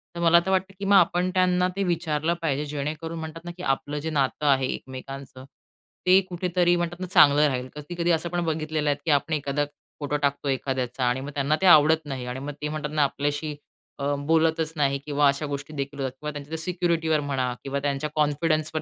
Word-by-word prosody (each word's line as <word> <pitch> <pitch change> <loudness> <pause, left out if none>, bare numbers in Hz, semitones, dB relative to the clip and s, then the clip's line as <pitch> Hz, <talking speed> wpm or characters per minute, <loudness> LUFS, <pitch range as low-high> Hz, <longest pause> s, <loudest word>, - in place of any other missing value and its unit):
तर - - -5
मला 170 0 +6
तर 190 - 0
वाटतं, 190 +1 0
की 200 - -4
मग 200 0 +4
आपण 180 0 +4
त्यांना 180 -1 +3
ते 195 - 0
विचारलं 165 -2 0
पाहिजे, 150 -2 -1
जेणेकरून 155 +3 -4
म्हणतात 160 +1 -8
ना, 175 - -5
की 180 - -8
आपलं 145 +2 -1
जे 160 +2 -4
नातं 145 0 0
आहे 135 -2 +3
एकमेकांचं, 130 0 -9 0.6
ते 185 +1 +7
कुठेतरी 175 0 +1
म्हणतात 175 0 -2
ना, 185 - -3
चांगलं 150 -5 +6
राहील. 130 -2 -2
कधी-कधी 170 +3 -2
असं 165 +1 0
पण 175 0 -1
बघितलेलं 155 -1 -1
आहे, 145 - +1
की 160 - +2
आपण 145 +2 +1
एखादा 145 0 0 0.3
फोटो 150 0 -1
टाकतो 140 0 -1
एखाद्याचा 130 -1 -2
आणि 125 +2 +1
मग 140 - -6
त्यांना 140 +2 +1
ते 190 - +2
आवडत 155 -1 +6
नाही 130 -3 -5
आणि 125 +1 -5
मग 145 +2 -5
ते 150 - -2
म्हणतात 155 -1 -4
ना, 150 - +3
आपल्याशी 145 +2 -2 0.4
अ, - - -4 0.2
बोलतच 160 0 +2
नाही 140 -2 +1
किंवा 145 -1 +2
अशा 140 +2 +1
गोष्टी 140 +1 -5
देखील 140 0 -4
होतात 130 -1 -1
किंवा 150 0 -4
त्यांच्या 145 +2 -6
सिक्युरिटीवर 165 -2 0
म्हणा 130 -3 -1
किंवा 140 +1 -2
त्यांच्या 140 +1 -2
कॉन्फिडन्सवर 155 +1 +1
150 Hz, 205 wpm, -25 LUFS, 140-165 Hz, 0.6 s, ते